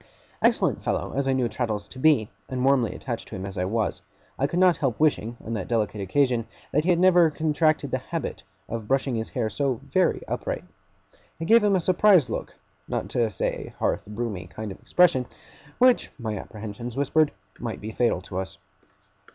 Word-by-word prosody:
Excellent - - +2
fellow - - -1
as 135 0 0
I 135 - +3
knew 130 -2 +1
Traddles 105 -3 -3
to 130 - -10
be, 130 -7 +4 0.2
and 130 0 -1
warmly 135 -5 +3
attached - - -5
to - - -8
him 95 - -5
as 100 0 -6
I 90 - -1
was, 110 +2 -1 0.4
I 140 - +2
could 170 - -3
not 180 -2 +5
help 135 -7 -1
wishing, 120 -7 +1
on 115 - -4
that 100 -5 -3
delicate 110 -3 0
occasion, 120 +2 +1 0.2
that 150 - +2
he - - +1
had 175 - +5
never 175 -2 +6
contracted 155 -2 +1
the 130 - 0
habit 165 +5 -4 0.3
of 115 -2 -5
brushing 135 -1 +1
his 110 -1 -2
hair 120 -4 -1
so 130 +3 -1
very 185 -1 +2
upright. - - -3 0.8
It 165 - -3
gave 230 +4 +6
him 205 -1 +4
a - - +3
surprised 180 - +4
look - - -4 0.3
not - - -3
to 115 -2 +1
say 100 - -1
a - - -6
hearth - - -1
broomy 105 -3 -4
kind 110 -2 -6
of 95 - -10
expression 145 -9 +3 0.5
which, 255 0 +4
my 110 -4 -3
apprehensions 110 +4 -7
whispered, 145 +2 +3 0.3
might 115 -2 -4
be 110 +1 -6
fatal 115 -5 +1
to 95 +1 -5
us. 95 - -6
125 Hz, 195 wpm, -25 LUFS, 110-155 Hz, 0.8 s, never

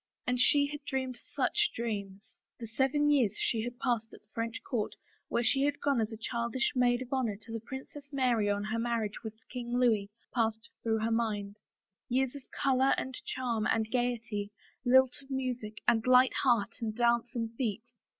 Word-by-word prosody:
And 250 0 0
she 285 +3 +5
had 290 0 -6
dreamed 260 -2 -2 0.2
such 420 0 +2
dreams! 205 -3 -4 0.2
The 235 - -5
seven 270 +6 +2
years 240 -8 +3
she 225 - 0
had 240 +2 -5
passed 235 -4 -1
at - - -16
the 210 - -39
French 230 0 -3
court 225 -5 -2 0.3
where 235 - 0
she 270 +3 +3
had 290 +1 +1
gone 280 -5 +2
as 220 +1 -1
a 220 - -6
childish 235 +3 -1
maid 245 0 +3
of 250 - -7
honor 235 -6 0
to 225 +1 -11
the 225 - -2
Princess 265 +4 -8
Mary 245 -6 +2
on 205 0 0
her 220 +2 -2
marriage 230 -3 -1
with 220 -2 -6
King 245 -1 -3
Louis, 220 -5 +3 0.2
passed 225 -1 0
through 220 -1 0
her 225 +1 0
mind 210 -3 -1 0.3
— 190 - -60
years 260 +1 +1
of 280 - -7
color 265 0 +3
and 260 - -3
charm 235 -4 -1
and 220 -1 +1
gayety, 235 -4 -1 0.3
lilt 260 +1 +4
of 270 - -19
music 250 -5 -3
and 230 0 +3
light 255 0 +6
hearts 240 -4 +1
and 220 -2 -2
dancing 235 0 +1
feet. 225 -2 -2
235 Hz, 190 wpm, -31 LUFS, 220-260 Hz, 0.3 s, light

